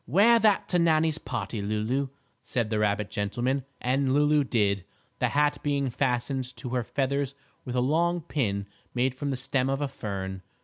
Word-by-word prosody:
"Wear 210 - +6
that 215 -3 +3
to 180 - +3
Nannie's 160 -1 +3
party, 120 -3 -4
Lulu," 110 +7 0 0.3
said 120 -3 -2
the 110 - +1
rabbit 105 -1 0
gentleman, 120 +6 -1
and 130 +1 +1
Lulu 150 0 +4
did, 100 -7 +1 0.4
the - - +2
hat 145 0 +2
being 140 -3 0
fastened 125 0 -1
to 125 - -6
her 125 0 0
feathers 140 +2 -1 0.3
with 125 -1 -4
a 125 - +3
long 170 +6 +2
pin 105 -11 -1 0.3
made 125 +1 +2
from 140 +2 -3
the 135 - -1
stem 135 0 0
of 135 0 0
a 145 - 0
fern. 95 -7 -5
130 Hz, 175 wpm, -27 LUFS, 115-145 Hz, 0.4 s, Wear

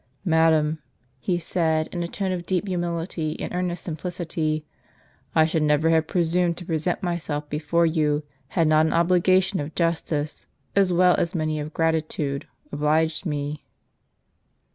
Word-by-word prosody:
" - - -38
Madam," 160 -1 +3 0.4
he 175 +6 0
said, 160 -2 0
in 175 - -3
a 170 - -2
tone 190 +2 -2
of 175 -2 -4
deep 185 +1 0
humility 170 -3 -2
and - - -4
earnest 180 -1 -2
simplicity. 160 -2 -3 0.3
" - - -35
I 160 - +6
should 160 0 0
never 150 +2 +3
have 160 -1 +3
presumed 175 0 +1
to 180 - -7
present 165 +1 -1
myself 160 -4 -2
before 155 +3 +1
you, 155 -2 +1 0.2
had 165 +3 +1
not 155 +1 +4
an - - -1
obligation 185 +3 +3
of 145 +2 -5
justice, 160 -3 -1 0.3
as 195 -2 +4
well 180 +1 +5
as 170 +3 -1
many 155 -1 -1
of 150 +1 -5
gratitude, 155 -3 -1 0.2
obliged 155 +4 +1
me." 145 0 -3
165 Hz, 155 wpm, -24 LUFS, 155-175 Hz, 0.4 s, I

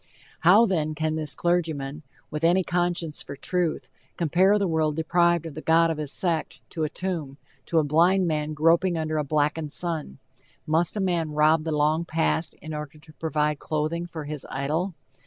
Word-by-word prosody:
How, 195 +8 +6
then, 155 -7 -1
can 155 0 -1
this 155 -2 -2
clergyman, 160 -5 -1 0.3
with 150 +1 -4
any 175 +3 +4
conscience 175 -3 -1
for 140 - -8
truth, 175 +3 -2 0.3
compare 175 +4 +3
a 205 -1 +3
world 160 -2 +1
deprived 170 +1 +2
of 160 - -6
the 155 - -7
god 165 +1 +4
of 155 - -4
his 150 -2 -2
sect, 170 -4 0
to 160 - -3
a 155 - 0
tomb 160 -8 -4 0.3
to 165 - 0
a 160 - +5
blind 175 +6 +3
man 155 -2 -1
groping 165 +3 +3
under 155 -1 -1
a - - 0
blackened 150 +1 0
sun? 160 - -3 0.5
Must 165 +5 +1
a - - 0
man 170 -5 0
rob 155 +1 +3
the 160 - -1
long 155 +2 +2
past 160 -1 -1
in 155 0 -6
order 150 -1 -6
to 155 +1 -17
provide 150 -2 -1
clothing 160 +3 -2
for 160 -3 -7
his 150 -1 -4
idol? 155 +7 -2
160 Hz, 185 wpm, -25 LUFS, 150-170 Hz, 0.5 s, How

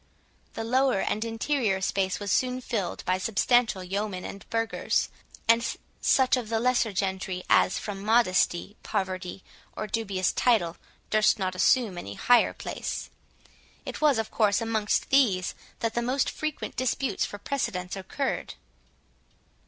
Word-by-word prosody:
The 225 - -3
lower 255 -1 +2
and 215 +3 -1
interior 225 -2 0
space 190 0 0
was 205 -2 -3
soon 255 0 +1
filled 220 -7 -3
by 185 +1 +1
substantial 225 0 +2
yeomen 195 0 -3
and 200 - -9
burghers, 225 0 0 0.4
and 230 +1 +5 0.4
such 260 -1 +4
of 240 -4 -4
the 225 -1 +1
lesser 245 -2 +2
gentry, 190 -1 -2
as, 190 - +4
from 200 -2 -5
modesty, 205 -3 +2
poverty, 185 -1 -3 0.3
or 215 - -2
dubious 195 -4 -1
title, 210 -9 +2 0.3
durst 215 0 +4
not 185 -2 -1
assume 195 0 +2
any 100 - -7
higher 245 - +4
place. - - -5 0.7
It - - -6
was 295 -5 +4
of 225 -1 -2
course 205 -2 +3
amongst 225 -2 0
these 220 -10 +3 0.3
that 230 -1 0
the 240 - 0
most 255 +3 0
frequent 310 -1 -4
disputes 255 +2 0
for 205 - -4
precedence 190 -7 -3
occurred. 260 +8 -3
215 Hz, 140 wpm, -27 LUFS, 190-240 Hz, 0.7 s, and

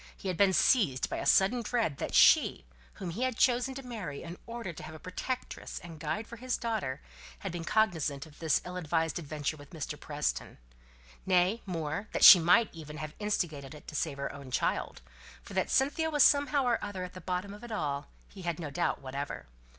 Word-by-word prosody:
He 195 - -4
had 180 - -2
been 200 0 +5
seized 180 - +3
by - - -2
a - - -3
sudden 195 - +4
dread 225 - -1
that - - -3
she, - - +5 0.3
whom 180 -3 -6
he 200 +9 -5
had 255 -2 0
chosen 250 +1 +2
to 270 - -6
marry 210 - -6
in 170 +1 -8
order 230 -6 -5
to - - -10
have 155 +1 -9
a - - -10
protectress 250 +9 -5
and 165 -3 -9
guide 215 +8 -3
for 235 - -10
his 255 +2 -2
daughter, 210 - -3 0.4
had 195 - -5
been 170 -1 -5
cognizant 165 -9 +1
of 155 -2 -17
this 160 -4 +1
ill 180 0 -6
advised 165 -1 0
adventure 155 -1 -3
with 145 -1 -13
Mr. 150 -3 -6
Preston; 150 -1 -3 0.7
nay, 185 +4 +2
more, 165 +3 -3
that - - 0
she 185 - +12
might 180 +7 +4
even 155 -2 -9
have 155 0 -6
instigated 160 -9 -2
it 150 - -14
to - - -10
save 150 -2 -1
her 140 - -4
own 140 -2 -10
child; 125 - -1 0.4
for - - -11
that - - 0
Cynthia 295 +4 +2
was, 295 -3 +4
somehow 285 -1 +4
or 240 -2 +1
other, 200 -3 -4
at 180 - -7
the 185 - -9
bottom 185 +3 -3
of 210 - -12
it 240 - -8
all 145 -7 -2 0.2
he 195 - -12
had 170 -3 -2
no 155 -4 -5
doubt 170 -2 -1
whatever. 135 +2 -5
180 Hz, 210 wpm, -30 LUFS, 155-225 Hz, 0.7 s, she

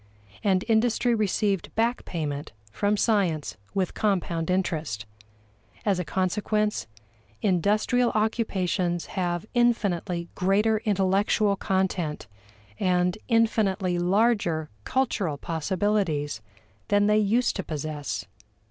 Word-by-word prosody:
And 190 -3 +2
industry 235 +1 +2
received 205 -3 0
back 230 +2 0
payment 150 - -4 0.2
from 205 - +1
science 190 -10 +1 0.2
with 190 -2 0
compound 175 -5 0
interest. 160 - -1 0.8
As 195 -3 +2
a - - 0
consequence, 210 - 0 0.6
industrial 210 +6 +2
occupations 190 -6 0
have 175 0 -1
infinitely 200 -8 +1
greater 210 +4 +2
intellectual 200 +1 +2
content 190 -5 -1 0.5
and 180 0 +2
infinitely 210 -6 +2
larger 180 -4 +1
cultural 205 - 0
possibilities 165 - -1 0.5
than 205 0 +3
they 210 +1 +4
used 220 +4 +2
to 195 - -2
possess. 150 - -4
195 Hz, 95 wpm, -26 LUFS, 175-215 Hz, 0.8 s, they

